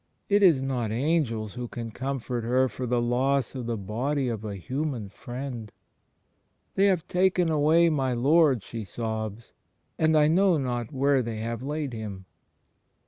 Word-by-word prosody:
It 205 Hz, 0 st, +4 dB
is 165 Hz, -9 st, +5 dB
not 125 Hz, -5 st, -1 dB
angels 115 Hz, -5 st, 0 dB
who 125 Hz, 0 st, -5 dB
can 115 Hz, -1 st, -6 dB
comfort 130 Hz, -1 st, -3 dB
her 130 Hz, +3 st, +2 dB
for 125 Hz, 0 st, -5 dB
the 120 Hz, 0 st, +1 dB
loss 125 Hz, +2 st, +1 dB
of 125 Hz, -3 st, -5 dB
the 115 Hz, -1 st, -1 dB
body 125 Hz, +7 st, -1 dB
of 110 Hz, -2 st, -4 dB
a 105 Hz, -2 st, -4 dB
human 130 Hz, -, -3 dB
Friend. 120 Hz, 0 st, -7 dB, 1.0 s
"They 195 Hz, +1 st, +4 dB
have 185 Hz, -5 st, +1 dB
taken 180 Hz, -1 st, +2 dB
away 155 Hz, +3 st, +4 dB
my 135 Hz, -4 st, 0 dB
Lord," 135 Hz, -, +3 dB
she 115 Hz, +1 st, -6 dB
sobs, 110 Hz, +1 st, -5 dB, 0.5 s
"and 160 Hz, 0 st, +4 dB
I 150 Hz, -1 st, +5 dB
know 180 Hz, +2 st, +4 dB
not 120 Hz, -4 st, -2 dB
where 140 Hz, -1 st, +2 dB
they 115 Hz, -2 st, -4 dB
have 115 Hz, +1 st, -4 dB
laid 145 Hz, -1 st, -3 dB
Him." 105 Hz, -4 st, -6 dB
130 Hz, 160 wpm, -27 LUFS, 115-150 Hz, 1.0 s, is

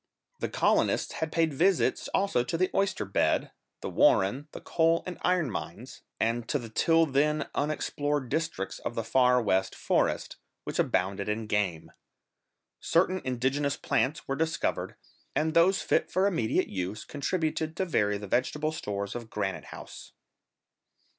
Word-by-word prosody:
The -, -, -2 dB
colonists -, -, +2 dB
had 160 Hz, -1 st, -3 dB
paid 165 Hz, -2 st, +1 dB
visits 180 Hz, +6 st, +2 dB
also 195 Hz, -11 st, +1 dB
to 145 Hz, +7 st, -2 dB
the 185 Hz, +2 st, +1 dB
oyster 195 Hz, -, 0 dB
bed, 95 Hz, -, +1 dB, 0.3 s
the -, -, -4 dB
warren, 125 Hz, +10 st, +3 dB
the -, -, -8 dB
coal 165 Hz, 0 st, +2 dB
and 180 Hz, -, -6 dB
iron 175 Hz, -7 st, +1 dB
mines, -, -, -7 dB, 0.2 s
and 115 Hz, +1 st, 0 dB
to -, -, +2 dB
the 120 Hz, -4 st, -7 dB
till 165 Hz, +8 st, +3 dB
then 150 Hz, +1 st, +1 dB
unexplored 145 Hz, -1 st, -1 dB
districts 160 Hz, -9 st, -2 dB
of 115 Hz, -, -5 dB
the 115 Hz, -, -1 dB
Far 125 Hz, +2 st, +4 dB
West 95 Hz, -4 st, +1 dB
forest, -, -, 0 dB, 0.3 s
which -, -, -4 dB
abounded 95 Hz, +2 st, 0 dB
in 110 Hz, +1 st, -2 dB
game. 100 Hz, -6 st, -1 dB, 0.9 s
Certain 185 Hz, +2 st, +2 dB
indigenous 135 Hz, +3 st, 0 dB
plants 145 Hz, +4 st, 0 dB
were 135 Hz, -, -1 dB
discovered, 160 Hz, +2 st, -1 dB, 0.4 s
and 155 Hz, +1 st, +1 dB
those 180 Hz, +4 st, +4 dB
fit -, -, +1 dB
for 185 Hz, +2 st, +2 dB
immediate 165 Hz, -, +1 dB
use, 95 Hz, +3 st, -4 dB
contributed 155 Hz, +1 st, -2 dB
to 190 Hz, -, 0 dB
vary 105 Hz, -, +1 dB
the 105 Hz, -, -7 dB
vegetable 150 Hz, +8 st, 0 dB
stores 100 Hz, -9 st, -4 dB
of 120 Hz, -2 st, -7 dB
Granite 100 Hz, -3 st, -3 dB
House. -, -, -10 dB
140 Hz, 150 wpm, -28 LUFS, 110-165 Hz, 0.9 s, Far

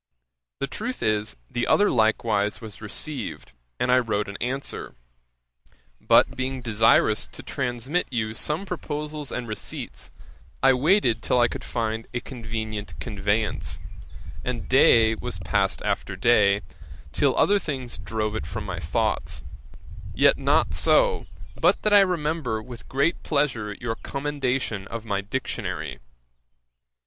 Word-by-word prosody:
The -, -, -1 dB
truth 225 Hz, -, -5 dB
is, 105 Hz, -, 0 dB
the 120 Hz, -, -2 dB
other 205 Hz, 0 st, +4 dB
likewise 110 Hz, -2 st, +2 dB
was 110 Hz, -3 st, -10 dB
received, 130 Hz, -, -4 dB, 0.3 s
and 125 Hz, -, +2 dB
I 125 Hz, -, +6 dB
wrote 105 Hz, -4 st, -1 dB
an 100 Hz, 0 st, -6 dB
answer; 135 Hz, +3 st, -4 dB, 1.1 s
but -, -, +5 dB
being 130 Hz, 0 st, -3 dB
desirous 110 Hz, -1 st, +3 dB
to 130 Hz, -, -11 dB
transmit 130 Hz, +5 st, -1 dB
you 110 Hz, -4 st, -2 dB
some 150 Hz, -, -2 dB
proposals 150 Hz, -4 st, -4 dB
and 125 Hz, -1 st, -4 dB
receipts, 110 Hz, -, -6 dB, 0.5 s
I 135 Hz, -, +7 dB
waited 135 Hz, -, +3 dB
till 125 Hz, -, +2 dB
I 120 Hz, -, +5 dB
could -, -, -6 dB
find 110 Hz, -1 st, -2 dB
a -, -, +1 dB
convenient 110 Hz, -4 st, -5 dB
conveyance, 105 Hz, -1 st, -1 dB, 0.6 s
and 120 Hz, -2 st, -3 dB
day 115 Hz, -4 st, +6 dB
was -, -, -4 dB
passed -, -, 0 dB
after 95 Hz, -, -1 dB
day, 100 Hz, -1 st, +4 dB, 0.5 s
till 140 Hz, -, +2 dB
other 205 Hz, 0 st, +4 dB
things 130 Hz, -8 st, -5 dB
drove 110 Hz, -1 st, -2 dB
it 110 Hz, -, -4 dB
from 110 Hz, -, -4 dB
my 90 Hz, -4 st, -4 dB
thoughts; 80 Hz, -2 st, -1 dB, 0.7 s
yet -, -, +5 dB
not -, -, +2 dB
so, -, -, +3 dB, 0.3 s
but 175 Hz, -, +2 dB
that 215 Hz, -, +3 dB
I 205 Hz, -, +10 dB
remember 160 Hz, -, +1 dB
with 120 Hz, +2 st, -11 dB
great 140 Hz, +6 st, +1 dB
pleasure 125 Hz, -9 st, 0 dB
your 120 Hz, -2 st, -2 dB
commendation 135 Hz, -7 st, -2 dB
of 115 Hz, -1 st, -6 dB
my 100 Hz, -3 st, -1 dB
Dictionary. 105 Hz, -, -4 dB
120 Hz, 135 wpm, -25 LUFS, 110-140 Hz, 1.1 s, I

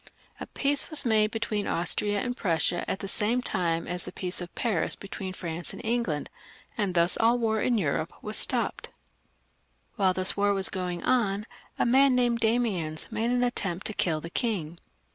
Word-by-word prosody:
A -, -, -6 dB
peace 280 Hz, 0 st, +1 dB
was 305 Hz, -3 st, +1 dB
made 215 Hz, -2 st, +3 dB
between 220 Hz, -2 st, -2 dB
Austria 200 Hz, +4 st, 0 dB
and 245 Hz, 0 st, -2 dB
Prussia 175 Hz, -4 st, +1 dB
at -, -, -2 dB
the 195 Hz, -, -4 dB
same 215 Hz, +5 st, +1 dB
time 165 Hz, -5 st, 0 dB
as 180 Hz, 0 st, -3 dB
the -, -, -7 dB
peace 180 Hz, -1 st, -2 dB
of 175 Hz, -, -8 dB
Paris 215 Hz, -9 st, 0 dB
between 195 Hz, -1 st, -6 dB
France 170 Hz, -2 st, -5 dB
and -, -, -9 dB
England, 225 Hz, -11 st, -1 dB, 0.5 s
and 200 Hz, -6 st, -1 dB
thus 170 Hz, +1 st, +2 dB
aU 230 Hz, +1 st, +5 dB
the. -, -, +1 dB
war 220 Hz, -2 st, 0 dB
in 245 Hz, -2 st, +2 dB
Europe 160 Hz, -2 st, -1 dB, 0.2 s
stopped. -, -, 0 dB, 1.1 s
While 190 Hz, -3 st, +3 dB
this 185 Hz, 0 st, +3 dB
war 200 Hz, 0 st, +2 dB
was 195 Hz, -1 st, +3 dB
going 180 Hz, -2 st, -3 dB
on, 215 Hz, -5 st, +1 dB, 0.3 s
a -, -, +2 dB
man 265 Hz, +2 st, +5 dB
named 240 Hz, -2 st, +2 dB
Damiens 220 Hz, -10 st, 0 dB
made 225 Hz, +2 st, 0 dB
an 245 Hz, 0 st, +2 dB
attempt 195 Hz, -7 st, 0 dB
to 215 Hz, -, -1 dB
kill 165 Hz, -6 st, 0 dB
the 165 Hz, -, -7 dB
king. 175 Hz, -9 st, -2 dB
205 Hz, 180 wpm, -27 LUFS, 175-235 Hz, 1.1 s, aU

